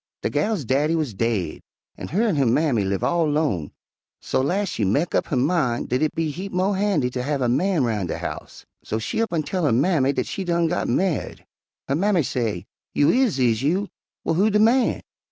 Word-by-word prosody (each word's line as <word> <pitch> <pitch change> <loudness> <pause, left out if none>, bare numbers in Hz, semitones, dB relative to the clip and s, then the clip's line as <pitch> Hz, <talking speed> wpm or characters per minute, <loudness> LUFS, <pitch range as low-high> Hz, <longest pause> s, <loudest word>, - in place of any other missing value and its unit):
"De - - 0
gal's 210 - 0
daddy 145 +7 +1
wuz 155 -8 -1
daid 100 -6 -2 0.3
an' - - -7
her 200 +8 0
an' 215 -7 +1
her 140 -2 +2
mammy 125 -3 +2
live 95 0 -2
all 170 -3 +2
'lone, 145 - 0 0.5
so - - -1
las' 190 +9 0
she 110 - -2
mek 140 - +1
up - - +1
her - - -2
min' 130 -3 +1
dat 125 +1 -1
it 155 - 0
be 160 -2 -1
heap 190 +6 -6
mo' 185 +2 +1
handy 195 -9 +1
ter 125 - -3
have 140 +2 -1
a - - +2
man 160 +5 +1
roun' 105 -6 -1
de - - -3
house, - - -7 0.2
so 110 - -3
she 110 - -2
up 230 - -1
an' 165 -3 0
tell 180 +5 -2
her 145 - +3
mammy 140 +2 +2
dat 130 -3 -1
she 195 - -4
done 170 -2 +1
got 175 +2 -1
ma'ied. 185 -5 -1 0.4
Her 135 - 0
mammy 180 +2 +2
say, 110 -8 -2 0.3
'You 145 - +4
is, 250 - +2
is 120 -3 +2
you? 180 +9 0 0.4
Well, - - +1
who 195 +6 +3
de 210 - +2
man?' 230 +3 +3
150 Hz, 220 wpm, -23 LUFS, 125-185 Hz, 0.5 s, You